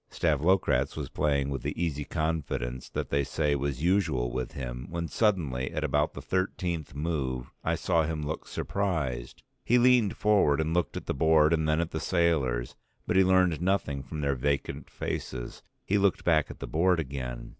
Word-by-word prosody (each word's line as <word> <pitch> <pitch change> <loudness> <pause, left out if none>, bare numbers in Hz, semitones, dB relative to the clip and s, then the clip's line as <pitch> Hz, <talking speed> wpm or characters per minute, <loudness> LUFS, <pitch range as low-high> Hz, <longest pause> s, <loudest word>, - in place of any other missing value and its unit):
Stavlokratz 85 +5 +1
was - - -4
playing 70 -2 0
with 70 - -3
the - - -4
easy 75 -4 -1
confidence 70 -6 -2
that - - -4
they 70 0 +2
say 75 +1 0
was 70 0 -2
usual 80 -10 +1
with 65 0 -4
him, 60 -1 -5
when 85 0 -3
suddenly 80 - 0
at - - -3
about 75 +1 +1
the - - -7
thirteenth 90 -5 -2
move 70 -5 -2
I - - +1
saw 85 -3 +1
him 80 -1 -2
look 75 +2 -4
surprised; 80 -12 -2 0.2
he 120 - +4
leaned 125 -4 +4
forward 100 -9 +3
and 80 +1 0
looked 90 0 0
at - - -6
the - - -1
board 80 +1 +4
and 80 -1 +1
then 75 +1 +2
at 85 0 -1
the 80 - -3
sailors, 75 -11 +1 0.3
but - - -1
he 95 - +6
learned 90 -4 +3
nothing 90 -7 0
from 75 +3 -6
their 70 -1 +1
vacant 70 +2 -2
faces; - - -5 0.2
he 100 +1 +2
looked 100 -1 +2
back 80 -3 +3
at - - -9
the - - -6
board 90 +2 +2
again. 65 -5 -5
80 Hz, 185 wpm, -28 LUFS, 70-85 Hz, 0.3 s, he